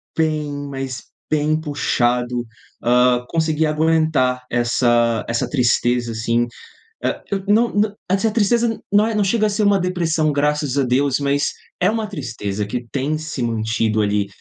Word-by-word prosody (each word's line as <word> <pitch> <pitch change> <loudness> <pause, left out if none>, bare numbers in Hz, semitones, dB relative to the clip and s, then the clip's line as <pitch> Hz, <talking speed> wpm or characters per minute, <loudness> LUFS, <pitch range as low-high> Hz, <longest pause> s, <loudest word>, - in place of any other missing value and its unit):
bem, 155 -2 0 0.2
mais 135 -2 -5 0.2
bem, 155 0 +1
puxado, 125 -5 0 0.4
ah, 125 +1 +3
conseguir 160 -1 +1
aguentar 155 -5 +1
essa 120 -1 +2
essa 115 0 -1
tristeza, 120 -2 +1
assim. 115 +1 0 0.6
Ah, - - -1
eu 195 -1 -2
não 225 +3 +4
não 205 0 +1 0.2
essa 195 +4 +2
tristeza 230 +1 +2 0.2
não 205 +1 +5
é, 225 - -2
não 210 -1 +2
chega 215 +2 +2
a - - 0
ser 205 +1 -1
uma 200 -1 +4
depressão, 170 -4 0
graças 145 -1 0
a 140 - +3
Deus, 130 +2 +1
mas 140 0 +1 0.3
é 180 - +3
uma 220 -1 -2
tristeza 105 - -4
que 120 +4 -4
tem 140 +3 -1
se 155 -3 -6
mantido 110 -1 0
ali 100 0 +1
145 Hz, 155 wpm, -20 LUFS, 120-170 Hz, 0.6 s, não